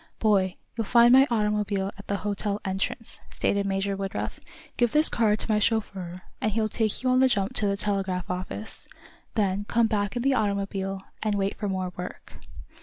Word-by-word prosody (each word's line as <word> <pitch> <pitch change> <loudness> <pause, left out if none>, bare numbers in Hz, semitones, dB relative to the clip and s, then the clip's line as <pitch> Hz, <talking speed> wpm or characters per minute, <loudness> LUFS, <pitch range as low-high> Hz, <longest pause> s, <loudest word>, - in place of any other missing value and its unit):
"Boy, 195 -4 +2 0.2
you'll 225 -1 -2
find 240 +1 +6
my 265 +2 +7
automobile 210 -3 0
at 200 - -13
the 200 - 0
hotel 205 0 -1
entrance," 195 +4 -3
stated 200 0 0
Major 195 0 0
Woodruff. 195 0 -4 0.4
"Give 240 -2 +2
this 305 +4 +5
card 215 -2 +2
to 220 - -2
my 210 - +3
chauffeur, 195 -5 -1 0.3
and 215 - +1
he'll 220 +1 +1
take 215 +2 0
you 255 - +2
on 255 - +4
the 265 - +6
jump 200 -5 0
to 210 - +4
the 200 0 0
telegraph 195 -3 -1
office. 185 +4 -5 0.5
Then 200 -2 +1
come 235 +2 +2
back 205 -1 -1
in 240 - -1
the 275 0 +3
automobile, 195 -3 -1 0.2
and 215 -2 0
wait 195 0 0
for 205 - -3
more 185 -1 -2
work." 180 0 -7
205 Hz, 185 wpm, -26 LUFS, 195-220 Hz, 0.5 s, my